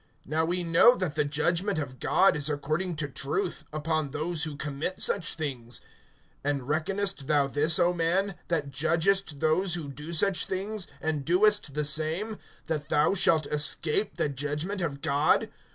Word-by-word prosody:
(2)Now 160 +3 0
we 180 +1 -1
know 170 +9 +5
that 185 -8 -2
the 150 -1 +1
judgment 170 +6 0
of 130 -4 -5
God 195 -4 +3
is 150 0 0
according 155 +5 -2
to 150 -1 -2
truth, 140 +1 -3
upon 155 -1 -2
those 155 +3 -1
who 150 -3 -6
commit 150 +5 -4
such 175 -6 +1
things. 130 -7 -5 0.6
(3)And 140 -2 -1
reckonest 180 +1 0
thou 145 -2 +3
this, 150 +4 +2
O 175 -1 +3
man, 180 +4 0
that 150 -5 -2
judgest 160 +2 +1
those 170 +3 +2
who 155 -5 -5
do 150 +4 -8
such 180 +3 +2
things, 195 +1 -4
and 155 -3 -2
doest 180 -2 +3
the 150 0 -1
same, 160 +9 0 0.3
that 150 -2 -3
thou 150 +5 +3
shalt 165 -5 +3
escape 150 +6 +1
the - - 0
judgment 150 +8 -3
of 145 -5 -3
God? 145 +2 +2
155 Hz, 165 wpm, -27 LUFS, 145-180 Hz, 0.6 s, know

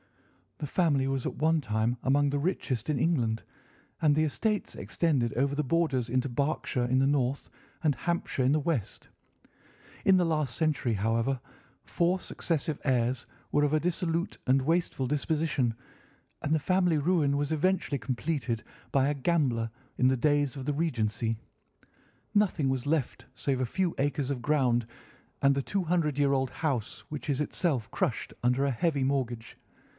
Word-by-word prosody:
"The 150 - -4
family 145 -4 +2
was 135 -2 -1
at - - -4
one 160 +2 +2
time 110 0 0
among 140 +2 +3
the 145 0 0
richest 140 - -1
in 145 -4 +1
England, 120 -8 +1 0.6
and 150 -2 +4
the 155 - +3
estates 210 +8 -1
extended 135 -9 0
over 140 +3 +1
the 150 - 0
borders 140 -5 +1
into 130 +2 +1
Berkshire 135 -1 -1
in 130 +2 +2
the 135 - +3
north, 140 -1 0 0.3
and 150 -2 +3
Hampshire 170 -6 -1
in 130 - +3
the 155 - +3
west. 145 - -3 1.0
In 190 -1 +6
the 180 - +3
last 155 -6 0
century, 150 -7 +1
however, 115 +5 0 0.4
four 175 +2 +1
successive 160 -4 -2
heirs 125 -2 +1 0.3
were 145 - +3
of 145 0 +1
a 155 - +4
dissolute 170 0 -1
and 135 +1 +4
wasteful 165 -4 0
disposition, 145 -4 0 0.7
and 145 - +1
the 160 - +3
family 180 0 +2
ruin 145 -3 +2
was 145 +1 -1
eventually 160 -2 +1
completed 130 -2 -2 0.3
by 135 -1 +3
a 145 - 0
gambler 135 -7 +1 0.3
in 125 - +4
the 130 - +2
days 145 0 +2
of 135 -2 -6
the 145 - 0
Regency. 115 -7 -1 1.0
Nothing 185 -9 +2
was 130 0 -2
left 145 -4 -1
save 135 -2 -1
a - - +2
few 180 +7 -1
acres 145 -1 0
of 125 -4 -3
ground, 125 -5 +2 0.6
and 140 0 +5
the 140 - 0
two 195 +5 -1
hundred 160 -4 0
year 140 -1 +3
old 135 -1 +1
house, 130 -7 -3
which 150 0 -6
is 140 0 +1
itself 145 - 0
crushed - - -1
under 125 +3 +2
a 140 - +1
heavy 140 +2 0
mortgage. 125 -4 -2
140 Hz, 165 wpm, -29 LUFS, 130-160 Hz, 1.0 s, In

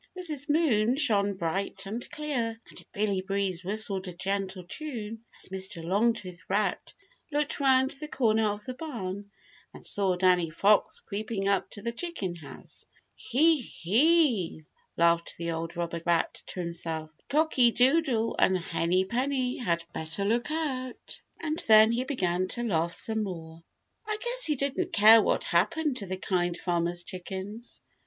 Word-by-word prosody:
Mrs. 305 -6 -3
Moon 260 -7 +3
shone 205 -8 +3
bright 190 +3 -2
and 220 +5 -5
clear 245 -7 -2
and - - -2
Billy 200 -2 0
Breeze 190 -2 -1
whistled 195 -1 -1
a 180 - -5
gentle 190 0 -3
tune 230 - -6
as - - -5
Mr. 190 -3 -3
Longtooth 200 -1 0
Rat 210 +1 -1 0.4
looked 295 0 -1
around 265 0 +4
the 300 +2 -2
corner 220 -6 +2
of 205 0 -3
the 255 - -4
barn 205 - -6 0.5
and - - -12
saw 195 -3 +1
Danny 180 -2 +3
Fox 200 +6 +2
creeping 210 -1 -3
up 200 -1 +1
to 205 - -8
the 235 - -1
chicken 235 - -4
house. 155 -3 -11 0.3
"He, 305 +4 +2
he!" 230 - +2 0.3
laughed 170 0 +2
the 170 0 -3
old 165 +1 -4
robber 170 -1 -3
rat 170 -1 0
to 185 - -5
himself, 165 -2 -4 0.2
"Cocky 290 -5 +4
Doodle 250 -2 +2
and 190 - +4
Henny 175 +2 0
Penny 255 +3 -1
had 170 -8 -1
better 160 +5 -3
look 235 +6 +1
out." 270 -6 -4 0.2
And 315 +1 -2
then 220 0 +8
he 245 +2 0
began 185 -9 0
to 240 +5 -3
laugh 170 -6 0
some 220 -1 -1
more. 165 -5 -6 0.5
I 430 -1 -1
guess - - 0
he 300 - +2
didn't 275 0 -2
care 220 +2 +8
what - - +1
happened 320 -5 +1
to 200 - -4
the 185 +1 -3
Kind 175 -2 -1
Farmer's 175 0 -1
chickens. 190 +6 -7
210 Hz, 155 wpm, -28 LUFS, 180-255 Hz, 0.5 s, then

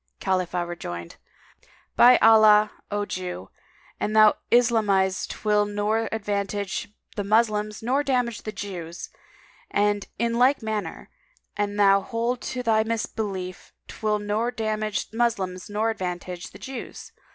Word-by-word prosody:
[FN#207] - - -46
Khalifah 180 -2 -1
rejoined, 85 - -7 0.8
"By 245 +1 +8
Allah, 215 -1 +7 0.2
O 205 0 -1
Jew, 180 - -6 0.5
an 210 - -1
thou 215 -1 +7 0.2
islamise 210 -6 +3
'twill 210 -1 +1
nor 210 +2 -1
advantage 205 -2 -3 0.2
the 205 - -2
Moslems 215 0 +1
nor 260 +5 +1
damage 250 -5 -1
the 215 - -5
Jews; 180 -5 -7 0.6
and 205 0 +1
in 235 +1 0
like 255 0 +4
manner, 210 -6 -4 0.4
an 205 0 -2
thou 200 -1 +5
hold 235 +3 -2
to 250 -1 -4
thy 220 -2 +3
misbelief 205 -5 -4
'twill 215 -1 -1
nor 210 +3 -1
damage 215 -3 -2
the 225 - -9
Moslems 195 -5 -1
nor 215 +2 0
advantage 180 -3 -5
the - - -13
Jews. 260 -2 -8
210 Hz, 130 wpm, -25 LUFS, 195-225 Hz, 0.8 s, By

